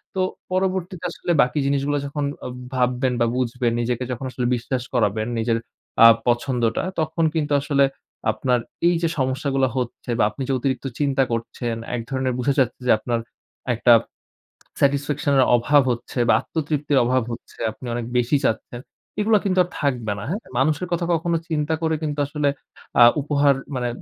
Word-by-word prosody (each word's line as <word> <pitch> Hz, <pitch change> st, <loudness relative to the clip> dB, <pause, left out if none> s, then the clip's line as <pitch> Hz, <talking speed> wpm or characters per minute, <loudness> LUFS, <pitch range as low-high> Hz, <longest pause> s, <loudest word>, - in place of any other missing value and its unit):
তো 190 Hz, -, +1 dB, 0.3 s
পরবর্তীতে 185 Hz, -1 st, -1 dB
আসলে 175 Hz, -, -3 dB
বাকি 125 Hz, +4 st, +1 dB
জিনিসগুলো 140 Hz, +1 st, +1 dB
যখন 145 Hz, +1 st, -3 dB, 0.2 s
আব 125 Hz, -, -5 dB, 0.2 s
ভাববেন 125 Hz, 0 st, +1 dB
বা, -, -, +5 dB
বুঝবেন, 125 Hz, -1 st, 0 dB
নিজেকে 120 Hz, +1 st, -1 dB
যখন 125 Hz, +2 st, -4 dB
আসলে 125 Hz, -1 st, -3 dB
বিশ্বাস 125 Hz, +1 st, -3 dB
করাবেন 110 Hz, -2 st, +1 dB
নিজের 115 Hz, 0 st, +1 dB, 0.5 s
আ -, -, +12 dB, 0.2 s
পছন্দটা 120 Hz, -1 st, +1 dB, 0.2 s
তখন 160 Hz, +1 st, -1 dB
কিন্তু 150 Hz, -2 st, 0 dB
আসলে 140 Hz, -1 st, +3 dB, 0.5 s
আপনার 125 Hz, +3 st, 0 dB, 0.3 s
এইযে 170 Hz, -1 st, +1 dB
সমস্যাগুলো 135 Hz, +1 st, +1 dB
হচ্ছে 125 Hz, 0 st, -4 dB
বা, -, -, +3 dB
আপনি 105 Hz, -, -10 dB
যে -, -, +2 dB
অতিরিক্ত 135 Hz, +1 st, -2 dB
চিন্তা 135 Hz, -2 st, +2 dB
করছেন, 115 Hz, 0 st, -3 dB, 0.2 s
এক 120 Hz, -, -2 dB
ধরনের 130 Hz, -1 st, -1 dB
বুঝা 140 Hz, +3 st, +1 dB
যাচ্ছে 125 Hz, 0 st, 0 dB
যে, -, -, +5 dB
আপনার 120 Hz, 0 st, -1 dB, 0.6 s
একটা 120 Hz, +1 st, +5 dB, 0.9 s
স্যাটিসফ্যাকশন 140 Hz, +1 st, +1 dB
এর 130 Hz, -, +6 dB
অভাব 145 Hz, +4 st, +4 dB
হচ্ছে 120 Hz, +2 st, -6 dB
বা, -, -, +6 dB
আত্মতৃপ্তির 150 Hz, -3 st, -1 dB
অভাব 130 Hz, +1 st, +2 dB
হচ্ছে। -, -, -10 dB
আপনি 125 Hz, +3 st, -11 dB
অনেক 120 Hz, -1 st, -3 dB
বেশি 125 Hz, +4 st, +2 dB
চাচ্ছেন। 120 Hz, +2 st, -3 dB, 0.4 s
এগুলো 215 Hz, 0 st, +4 dB
কিন্তু 185 Hz, -1 st, +1 dB
আর 175 Hz, -, -11 dB
থাকবে 120 Hz, -7 st, 0 dB
না। 105 Hz, -, -6 dB
হ্যাঁ? 205 Hz, -, -2 dB, 0.2 s
মানুষের 155 Hz, +3 st, +1 dB
কথা 170 Hz, 0 st, 0 dB
কখনো 165 Hz, +1 st, 0 dB
চিন্তা 155 Hz, 0 st, 0 dB
করে 160 Hz, 0 st, +1 dB
কিন্তু 150 Hz, -1 st, -3 dB
আসলে 145 Hz, 0 st, 0 dB, 0.5 s
আ -, -, +10 dB, 0.2 s
উপহার 145 Hz, -1 st, +3 dB
অ্যা -, -, -13 dB
মানে 125 Hz, -1 st, -1 dB
135 Hz, 165 wpm, -22 LUFS, 120-150 Hz, 0.9 s, আ